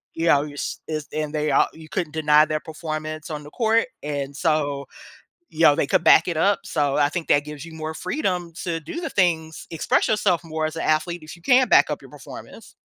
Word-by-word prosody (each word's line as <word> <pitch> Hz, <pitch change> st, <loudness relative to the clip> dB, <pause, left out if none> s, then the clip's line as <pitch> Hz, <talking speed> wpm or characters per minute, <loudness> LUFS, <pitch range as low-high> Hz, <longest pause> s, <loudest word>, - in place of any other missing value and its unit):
you 165 Hz, +1 st, -1 dB
know, 145 Hz, -3 st, +5 dB
your 145 Hz, -1 st, -8 dB
s -, -, -4 dB
it's 155 Hz, -2 st, -4 dB
and 155 Hz, 0 st, -3 dB
they 150 Hz, 0 st, 0 dB
ar 135 Hz, -, +4 dB
you 160 Hz, -1 st, -13 dB
couldn't 170 Hz, -5 st, -3 dB
deny 150 Hz, -1 st, +4 dB
their 155 Hz, 0 st, -2 dB
performance 155 Hz, 0 st, -6 dB
on 150 Hz, -, -4 dB
the 150 Hz, -, -11 dB
court. 225 Hz, +3 st, +2 dB, 0.2 s
And 140 Hz, -1 st, -4 dB
so, 145 Hz, -3 st, 0 dB, 0.7 s
you 160 Hz, +1 st, -2 dB
know, 150 Hz, -2 st, +7 dB
they -, -, 0 dB
could 185 Hz, -3 st, +2 dB
back 165 Hz, -, +6 dB
it 170 Hz, -, -2 dB
up, 200 Hz, +5 st, +2 dB
so 145 Hz, -3 st, 0 dB
I 145 Hz, -1 st, +3 dB
think 175 Hz, -1 st, -4 dB
that 145 Hz, 0 st, +3 dB
gives 150 Hz, -1 st, -8 dB
you 165 Hz, -, -11 dB
more 155 Hz, 0 st, -5 dB
freedom 180 Hz, -, -2 dB
to 170 Hz, -2 st, -2 dB
do 160 Hz, -, -6 dB
the 330 Hz, -, -4 dB
things, 160 Hz, -4 st, 0 dB
express 160 Hz, -, +1 dB
yourself 190 Hz, -5 st, +1 dB
more 160 Hz, -1 st, -3 dB
as 155 Hz, +1 st, -6 dB
an 165 Hz, -, -3 dB
athlete 160 Hz, +2 st, 0 dB
if 155 Hz, -, -9 dB
you 170 Hz, -, -21 dB
can 255 Hz, +5 st, +5 dB
back -, -, +5 dB
up -, -, -3 dB
your -, -, -13 dB
performance. -, -, -12 dB
155 Hz, 235 wpm, -23 LUFS, 150-170 Hz, 0.7 s, know